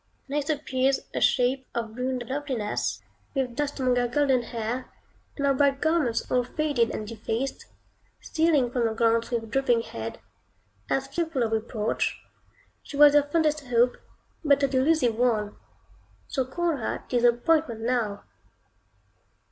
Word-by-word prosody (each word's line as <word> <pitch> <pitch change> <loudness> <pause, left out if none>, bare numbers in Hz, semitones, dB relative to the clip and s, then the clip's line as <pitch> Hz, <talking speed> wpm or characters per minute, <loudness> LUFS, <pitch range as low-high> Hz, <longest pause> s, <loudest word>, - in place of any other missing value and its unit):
Next 290 +1 -2
appears 270 -3 +1
a - - -2
shade 260 +1 +2
of 225 -2 -3
ruined 250 0 -2
loveliness, 260 -6 -2 0.3
with 255 -3 -1
dust 290 0 -2
among 255 -1 +2
her 245 0 +2
golden 265 0 +2
hair, 235 +1 -4 0.5
and 280 - -1
her 275 - +4
bright 275 0 +2
garments 305 -8 0
all 250 -1 +3
faded 255 -2 0
and 215 - -5
defaced, 230 +4 -4 0.5
stealing 310 -7 +1
from 245 -2 0
your 220 -1 -1
glance 230 0 +2
with 225 -3 -3
drooping 245 -3 +2
head, 115 - -6 0.7
as 270 0 0
fearful 300 -2 -1
of 225 - -1
reproach; 220 0 -1 0.6
she 285 - -8
was 295 0 +8
your 295 - +7
fondest 305 -1 0
Hope, 245 0 +3 0.5
but 285 -2 +3
a - - +5
delusive 265 -2 +2
one; 215 -4 +1 0.7
so 265 -2 -1
call 330 +4 -1
her 225 - -3
Disappointment 240 +1 +2
now. 225 -4 -1
255 Hz, 140 wpm, -26 LUFS, 235-285 Hz, 0.7 s, was